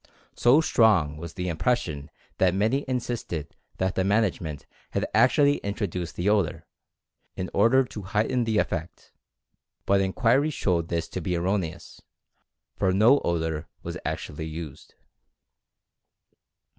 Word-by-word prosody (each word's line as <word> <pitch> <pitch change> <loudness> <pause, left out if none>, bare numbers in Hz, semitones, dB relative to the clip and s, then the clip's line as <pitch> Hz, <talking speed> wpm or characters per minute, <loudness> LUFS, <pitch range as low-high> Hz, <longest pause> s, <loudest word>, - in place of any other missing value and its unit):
So 130 +6 +5
strong 100 - +3
was 85 +1 -8
the 90 -1 -3
impression 80 - -1 0.3
that 95 -1 +3
many 110 +8 +1
insisted 120 - -3 0.2
that 95 0 0
the 95 - 0
management 95 -7 0 0.3
had - - 0
actually 145 +2 +4
in 100 0 -4
troduced 90 -4 -4
the 85 - -2
odor, 105 -5 +1 0.7
in 95 - -4
order 115 +6 +4
to 110 - -8
heighten 110 +5 0
the 110 -2 0
effect, 85 -4 -3 0.7
but 100 0 +3
inquiry 115 +9 +2
showed 90 - 0
this 85 -1 -2
to 95 - -5
be 90 +2 -1
erroneous, 90 -1 -3 0.7
for 95 -2 +1
no 110 +9 +5
odor 80 -2 -2 0.2
was - - -5
actually 80 +2 -4
used. 80 -3 -8
95 Hz, 130 wpm, -26 LUFS, 85-115 Hz, 0.7 s, So